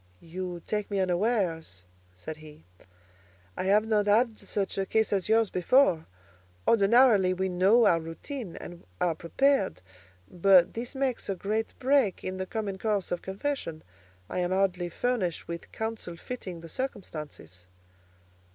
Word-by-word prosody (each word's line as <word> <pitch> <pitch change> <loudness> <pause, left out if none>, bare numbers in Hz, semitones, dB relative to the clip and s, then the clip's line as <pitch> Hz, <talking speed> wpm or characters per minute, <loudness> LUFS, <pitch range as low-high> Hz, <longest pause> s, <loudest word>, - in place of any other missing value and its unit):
"You 175 0 -6
take 210 -1 -2
me 200 -1 -1
unawares," 180 - -1 0.3
said 155 +12 -7
he. 155 - -14 0.9
"I - - -3
have 210 +3 +4
not 210 -2 +1
had 225 +2 +3
such 195 -1 -3
a 195 - 0
case 220 -1 +1
as 195 0 -1
yours 225 -1 +3
before: 180 - +3 0.6
ordinarily 210 -3 +5
we 190 +1 -1
know 195 +6 +4
our 170 -5 +4
routine, 170 - -7
and 175 -1 -9 0.2
are 175 -2 +2
prepared; 195 - +1 0.4
but 180 - +4
this 240 +4 -5
makes 265 -5 -1
a 195 - 0
great 215 +4 -2
break 265 -7 +2
in 185 0 -4
the 190 0 -4
common 200 -3 -4
course 210 -3 -1
of 175 - -2
confession. 190 - -4 0.4
I - - -3
am 175 0 0
hardly 185 -2 +1
furnished 190 -4 -1
with 170 0 -7
counsel 220 -6 -5
fitting 185 -7 -7
the 165 - -9
circumstances." 150 - -7
190 Hz, 145 wpm, -28 LUFS, 175-220 Hz, 0.9 s, ordinarily